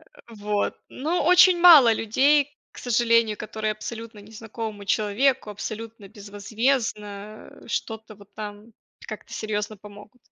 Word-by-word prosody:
Э, 235 Hz, -, -19 dB
вот. 205 Hz, 0 st, -2 dB
Но 310 Hz, +4 st, -2 dB
очень 360 Hz, 0 st, +6 dB
мало 300 Hz, -10 st, +8 dB
людей, 285 Hz, +7 st, +1 dB, 0.2 s
к -, -, -14 dB
сожалению, 230 Hz, -3 st, +1 dB
которые 215 Hz, 0 st, -4 dB
абсолютно 225 Hz, 0 st, -9 dB
незнакомому 220 Hz, 0 st, -8 dB
человеку, 215 Hz, +4 st, 0 dB
абсолютно 215 Hz, 0 st, -8 dB
безвозмездно, 210 Hz, 0 st, -4 dB, 0.2 s
э, -, -, -16 dB
что-то 220 Hz, -1 st, -5 dB
вот 200 Hz, 0 st, -19 dB
там 210 Hz, +1 st, -9 dB, 0.3 s
как-то -, -, -9 dB
серьёзно 215 Hz, 0 st, -4 dB
помогут. 210 Hz, +4 st, -15 dB
220 Hz, 120 wpm, -24 LUFS, 210-240 Hz, 0.3 s, мало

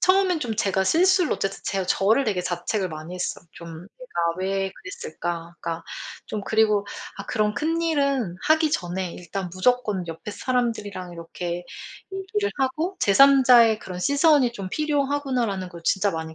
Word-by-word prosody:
처음엔 370 Hz, -2 st, +3 dB
좀 230 Hz, -5 st, -2 dB
제가 190 Hz, -3 st, +1 dB
실수를 360 Hz, -, +4 dB
어쨌든 195 Hz, 0 st, -2 dB
제가 195 Hz, -2 st, -1 dB
저를 215 Hz, +9 st, +3 dB
되게 200 Hz, -5 st, 0 dB
자책을 180 Hz, +2 st, -2 dB
많이 155 Hz, +3 st, -7 dB
했어요. 180 Hz, -1 st, -4 dB
좀 170 Hz, -1 st, -10 dB, 0.3 s
'내가 250 Hz, -9 st, -5 dB, 0.2 s
왜 195 Hz, 0 st, -1 dB
그랬을까.' 175 Hz, -, -6 dB
그러니까 165 Hz, 0 st, -4 dB, 0.4 s
좀 210 Hz, -2 st, -4 dB
그리고 215 Hz, -2 st, +2 dB, 0.3 s
'아 -, -, -7 dB
그런 210 Hz, -2 st, 0 dB
큰일은 285 Hz, -, 0 dB
하기 315 Hz, -1 st, +4 dB
전에 180 Hz, -, -2 dB
일단 180 Hz, +1 st, -5 dB
무조건 205 Hz, -3 st, +1 dB
옆에 165 Hz, +6 st, -6 dB
사람들이랑 205 Hz, -6 st, -2 dB
이렇게 175 Hz, +1 st, -5 dB, 0.5 s
얘기를 390 Hz, +2 st, -2 dB
하고 310 Hz, +8 st, -1 dB
제 200 Hz, -, +3 dB
3 275 Hz, +2 st, +7 dB
자의 230 Hz, -3 st, +7 dB
그런 180 Hz, -3 st, -7 dB
시선이 285 Hz, -, +4 dB
좀 195 Hz, -4 st, -6 dB
필요하구나.'라는 275 Hz, -10 st, -1 dB
걸 170 Hz, -2 st, -11 dB
진짜 200 Hz, +1 st, +2 dB
많이 160 Hz, 0 st, -5 dB
210 Hz, 340 characters per minute, -24 LUFS, 180-280 Hz, 0.5 s, 3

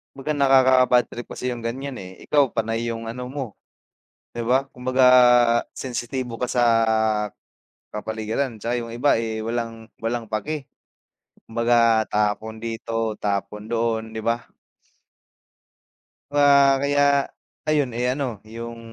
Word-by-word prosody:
Kumbaga 145 Hz, +3 st, -3 dB
nakaka-bad 130 Hz, -3 st, +5 dB
trip 120 Hz, -, -8 dB
kasi 125 Hz, -1 st, -3 dB
yung 120 Hz, -, -9 dB
ganiyan, 130 Hz, +4 st, -4 dB
eh. 95 Hz, -5 st, -8 dB, 0.2 s
Ikaw, 145 Hz, -4 st, +3 dB
panay 115 Hz, +1 st, -2 dB
yung 115 Hz, 0 st, -6 dB
ano 125 Hz, +2 st, -6 dB
mo, 135 Hz, -6 st, -5 dB, 0.8 s
'di 120 Hz, -, -3 dB
ba? 130 Hz, +3 st, +1 dB
Kumbaga 130 Hz, +1 st, -1 dB, 0.7 s
sensitibo 125 Hz, -1 st, -4 dB
ka 125 Hz, -, -1 dB
sa 125 Hz, -1 st, +1 dB, 1.3 s
kapaligiran, 110 Hz, +3 st, -3 dB
'tsaka 120 Hz, +1 st, -1 dB
yung 115 Hz, -, -9 dB
iba, 125 Hz, +5 st, +2 dB
eh, 110 Hz, -1 st, -3 dB
walang 115 Hz, 0 st, -4 dB, 0.2 s
walang 115 Hz, -1 st, -2 dB
paki. 140 Hz, +6 st, -4 dB, 0.7 s
Kumbaga 115 Hz, -1 st, +2 dB
tapon 110 Hz, +1 st, -1 dB
dito, 115 Hz, -1 st, -3 dB
tapon 105 Hz, +1 st, -3 dB
doon, 115 Hz, -1 st, -2 dB
'di 110 Hz, -, -4 dB
ba? 115 Hz, +2 st, -1 dB, 1.9 s
Wa 140 Hz, -1 st, +5 dB
kaya 140 Hz, 0 st, +3 dB, 0.4 s
ayun, 150 Hz, -4 st, +1 dB
eh, 120 Hz, +2 st, -2 dB
ano, 130 Hz, -7 st, -3 dB, 0.2 s
yung 115 Hz, 0 st, -7 dB
120 Hz, 125 wpm, -23 LUFS, 115-130 Hz, 1.9 s, nakaka-bad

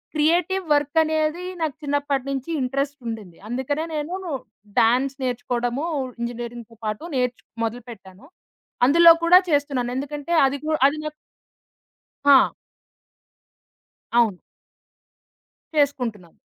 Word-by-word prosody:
Creative 350 Hz, +5 st, +2 dB
work 290 Hz, +2 st, 0 dB
అనేది 315 Hz, +2 st, -1 dB, 0.2 s
నాకు 310 Hz, -4 st, -1 dB
చిన్నప్పటినుంచి 280 Hz, -1 st, -2 dB
ఇంట్రెస్ట్ 275 Hz, +3 st, -1 dB
ఉండింది. 210 Hz, -7 st, -7 dB
అందుకనే 265 Hz, +6 st, -2 dB
నేను 305 Hz, +4 st, -3 dB, 0.6 s
డాన్స్ 255 Hz, +4 st, +3 dB
నేర్చుకోవడము, 245 Hz, +2 st, -2 dB, 0.4 s
ఇంజినీరింగ్‌తో 235 Hz, -1 st, -6 dB
పాటు 215 Hz, +5 st, -3 dB
నేర్చ్ 250 Hz, -1 st, 0 dB, 0.2 s
మొదలుపెట్టాను. 225 Hz, -3 st, -7 dB, 0.6 s
అందులో 335 Hz, +5 st, +8 dB
కూడా 345 Hz, +2 st, +8 dB
చేస్తున్నాను. 280 Hz, -5 st, 0 dB
ఎందుకంటే, 290 Hz, +3 st, -5 dB
అది 270 Hz, +1 st, 0 dB
కు 310 Hz, -, -3 dB, 0.2 s
అది 290 Hz, +2 st, -1 dB
నాకు 305 Hz, 0 st, -4 dB, 1.1 s
ఆ! 280 Hz, -2 st, +6 dB, 1.7 s
అవును. 220 Hz, -6 st, +2 dB, 1.4 s
చేసుకుంటున్నాను. 235 Hz, -, -1 dB
275 Hz, 95 wpm, -23 LUFS, 240-295 Hz, 1.7 s, అందులో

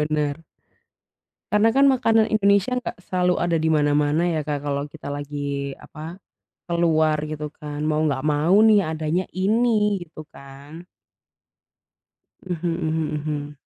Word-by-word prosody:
bener. 150 Hz, +1 st, -1 dB, 1.1 s
Karena 220 Hz, +2 st, +4 dB
kan 275 Hz, +1 st, +5 dB
makanan 225 Hz, -4 st, +3 dB
Indonesia 200 Hz, +3 st, +2 dB
enggak 250 Hz, -, -5 dB
selalu 180 Hz, -1 st, 0 dB
ada 175 Hz, -1 st, +1 dB
di 160 Hz, 0 st, 0 dB
mana-mana 150 Hz, +3 st, +2 dB
ya, 155 Hz, -3 st, -1 dB
Kak, 145 Hz, -2 st, -2 dB
kalau 140 Hz, 0 st, -2 dB
kita 150 Hz, 0 st, -10 dB
lagi, 145 Hz, -1 st, -4 dB
apa, 160 Hz, +5 st, -10 dB, 0.5 s
keluar 160 Hz, -2 st, +2 dB
gitu 150 Hz, 0 st, -5 dB
kan 150 Hz, 0 st, -8 dB
mau 155 Hz, 0 st, +1 dB
nggak 140 Hz, -4 st, 0 dB
mau 150 Hz, +5 st, +1 dB, 0.2 s
nih 205 Hz, -4 st, +5 dB
adanya 160 Hz, +3 st, -1 dB
ini, 210 Hz, 0 st, +1 dB
gitu 155 Hz, -2 st, -12 dB
kan. 140 Hz, +5 st, -12 dB, 1.6 s
Mhm 175 Hz, -1 st, -3 dB
mhm 160 Hz, -2 st, -2 dB
mhm. 145 Hz, -1 st, -5 dB
155 Hz, 130 wpm, -23 LUFS, 150-185 Hz, 1.6 s, kan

